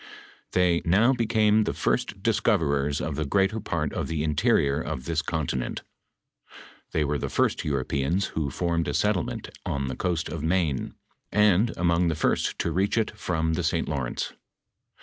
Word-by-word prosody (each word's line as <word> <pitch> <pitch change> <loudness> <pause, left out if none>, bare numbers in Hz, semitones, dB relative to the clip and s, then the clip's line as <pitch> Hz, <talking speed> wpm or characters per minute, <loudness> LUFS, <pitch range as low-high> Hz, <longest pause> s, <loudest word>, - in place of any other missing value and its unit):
Tliey 90 -2 +2
"now 105 +10 +4
became 110 -3 +3
the - - -2
first - - -1
discoverers 70 -2 +1
of 75 -2 -3
the 75 - -1
greater 95 +8 +1
part 80 -7 -2
of - - -2
the 80 -2 -2
interior 75 -1 +2
of 65 -4 -5
this 80 0 0
continent. 75 -6 -3 1.1
They 75 - +1
were 75 0 -1
the - - -2
firet - - +1
Europeans 70 +6 0
who 75 -3 -1
formed 85 +2 -1
a 75 - -1
settlement 105 -5 0
on 70 -1 -2
the 65 - -4
coast 85 0 -1
of 75 -1 -5
Maine, 80 -4 0 0.4
and 105 +1 +4
among 85 0 +2
the 80 - 0
first - - 0
to 85 - -1
reach 95 +7 +1
it 110 -1 0
from 80 -6 -1
tlie 85 +2 -1
St. 80 +1 0
Lawrence. 70 -5 -3
80 Hz, 165 wpm, -26 LUFS, 75-95 Hz, 1.1 s, now